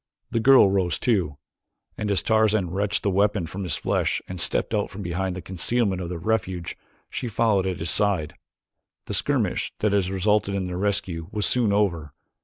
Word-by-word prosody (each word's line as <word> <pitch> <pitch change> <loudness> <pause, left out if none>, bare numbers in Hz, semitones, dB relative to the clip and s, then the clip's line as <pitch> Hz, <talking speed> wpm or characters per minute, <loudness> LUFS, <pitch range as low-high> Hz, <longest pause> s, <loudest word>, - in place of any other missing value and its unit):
The 115 - +1
girl 130 -1 +7
rose 95 -4 0
too, 90 - 0 0.6
and 105 - -3
as 100 - +2
Tarzan 110 -5 +2
wrenched 100 +2 -1
the 100 - +1
weapon 100 -1 +1
from 95 +5 -6
his 90 - 0
flesh - - 0
and 90 -2 -3
stepped - - +1
out 105 -2 0
from 100 +2 -8
behind 90 +1 -2
the 90 - -7
concealment 95 +1 -1
of 85 - -5
their 90 - -4
refuge, 90 -2 -2 0.3
she - - -4
followed 105 -4 +1
at 90 -2 -2
his 80 - 0
side. 100 -7 +1 0.7
The - - -5
skirmish - - 0
that 105 -1 0
had 100 -3 +2
resulted 100 +1 +1
in 95 - -1
their 90 0 -4
rescue 95 -5 -1
was 105 -1 -1
soon 120 -4 +2
over. 85 -8 0
100 Hz, 190 wpm, -24 LUFS, 90-105 Hz, 0.7 s, girl